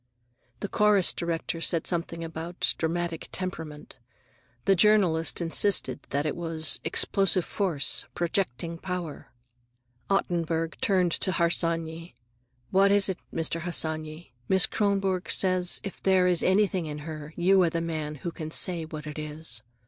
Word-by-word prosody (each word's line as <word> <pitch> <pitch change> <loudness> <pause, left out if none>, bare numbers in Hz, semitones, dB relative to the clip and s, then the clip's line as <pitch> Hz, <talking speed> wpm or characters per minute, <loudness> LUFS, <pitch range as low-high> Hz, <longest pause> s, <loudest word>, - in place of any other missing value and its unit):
The 205 - -2
chorus 210 -2 +3
director 165 -1 -3
said 165 -1 +1
something 170 -1 -2
about 165 +2 -2
"dramatic 170 0 -2
temperament." 160 -7 -5 0.7
The 195 - +4
journalist 180 -5 +3
insisted 170 +2 +2
that 145 +1 -1
it 155 - -1
was 165 -2 0
"explosive 185 +2 +1
force," 165 -9 -1
"projecting 170 -2 -2
power." 180 -5 -5 0.8
Ottenburg 165 -4 -1
turned 185 -3 +2
to 185 +2 -1
Harsanyi. 165 -1 -1 0.6
"What 195 +1 +4
is 200 -1 +4
it, 185 - -3
Mr. 165 0 -2
Harsanyi? 155 -3 -3 0.2
Miss 190 -1 +6
Kronborg 195 -3 -1
says 185 -2 +4
if 195 - -7
there 190 -1 +3
is 180 -2 +2
anything 190 -3 +2
in 150 0 -7
her, 155 -1 -8
you 185 +2 +4
are 175 - +3
the 165 - -2
man 155 -2 -4
who 170 - -1
can 155 -1 -7
say 170 0 +2
what 155 -1 -8
it 150 0 -6
is." 150 -6 -1
170 Hz, 140 wpm, -27 LUFS, 160-185 Hz, 0.8 s, Miss